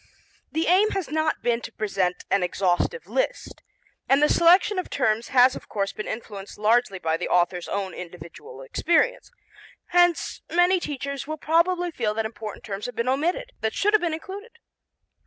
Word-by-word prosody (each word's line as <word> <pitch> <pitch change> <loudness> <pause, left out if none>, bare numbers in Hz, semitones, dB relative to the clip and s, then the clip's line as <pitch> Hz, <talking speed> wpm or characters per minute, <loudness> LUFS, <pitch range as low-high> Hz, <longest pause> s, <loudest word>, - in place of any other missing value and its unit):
The 320 +1 0
aim 385 +5 +4
has 380 - -3
not 315 0 0
been 240 -1 +1
to 230 - -8
present 195 -5 -2
an 195 - +3
exhaustive 180 - 0
list, - - -3 0.5
and 270 - +5
the 300 - +4
selection 365 +4 +4
of 365 - -5
terms 230 -4 0
has 255 0 +5
of - - -10
course 200 -1 -2
been 215 - -6
influenced 205 -3 -7
largely 220 -1 +2
by 160 -2 -1
the - - -4
author's 175 0 +1
own 195 -2 -3
individual 170 -6 -10
experience, 320 - +1 0.6
hence 350 -1 +2
many 355 +2 +4
teachers 280 -3 -5
will 310 0 -4
probably 345 +3 +1
feel 220 -8 -2
that 225 0 -1
important 220 -1 -7
terms 200 +1 -5
have 245 - -8
been 235 - -2
omitted 350 - 0
that 220 0 -1
should 415 +1 +2
have 430 - +5
been 345 -2 0
included. 405 +8 -10
255 Hz, 175 wpm, -25 LUFS, -, 0.6 s, and